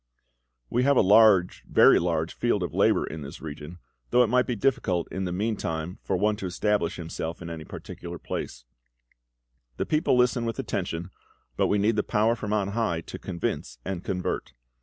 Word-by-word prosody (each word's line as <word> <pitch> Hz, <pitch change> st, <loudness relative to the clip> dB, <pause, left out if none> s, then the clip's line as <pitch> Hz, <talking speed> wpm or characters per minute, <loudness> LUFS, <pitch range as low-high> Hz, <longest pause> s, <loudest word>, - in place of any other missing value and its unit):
"We 120 Hz, -, 0 dB
have 140 Hz, +1 st, +3 dB
a -, -, +7 dB
large, 100 Hz, -2 st, +5 dB
very -, -, +6 dB
large, 80 Hz, -1 st, -1 dB
field 120 Hz, -5 st, 0 dB
of 90 Hz, -, -4 dB
labour -, -, +3 dB
in 80 Hz, -, -7 dB
this 70 Hz, 0 st, -8 dB
region, 75 Hz, +2 st, -8 dB, 0.3 s
though 125 Hz, -, +5 dB
it 115 Hz, -, 0 dB
might 125 Hz, 0 st, +3 dB
be 125 Hz, -, -1 dB
difficult 110 Hz, -8 st, 0 dB
in 95 Hz, 0 st, -3 dB
the 90 Hz, -, -3 dB
meantime 90 Hz, -4 st, -2 dB
for 95 Hz, -, -1 dB
one 105 Hz, +3 st, +2 dB
to 95 Hz, -, -4 dB
establish 90 Hz, -1 st, 0 dB
himself 80 Hz, 0 st, -5 dB
in 85 Hz, -1 st, -7 dB
any 80 Hz, -2 st, -7 dB
particular 85 Hz, +2 st, -8 dB
place; -, -, -6 dB, 1.1 s
the -, -, -1 dB
people 155 Hz, -4 st, +2 dB
listen 125 Hz, -1 st, +3 dB
with 115 Hz, -1 st, -3 dB
attention, 85 Hz, +3 st, -3 dB, 0.4 s
but -, -, +2 dB
we 105 Hz, -, +2 dB
need 105 Hz, +2 st, +2 dB
the -, -, +4 dB
Power 110 Hz, +2 st, +1 dB
from 110 Hz, -2 st, -5 dB
on 105 Hz, -2 st, +1 dB
High 100 Hz, -6 st, -1 dB
to -, -, -9 dB
convince 85 Hz, -8 st, -4 dB
and 95 Hz, -2 st, -4 dB
convert. 90 Hz, -2 st, -3 dB
95 Hz, 185 wpm, -26 LUFS, 85-110 Hz, 1.1 s, a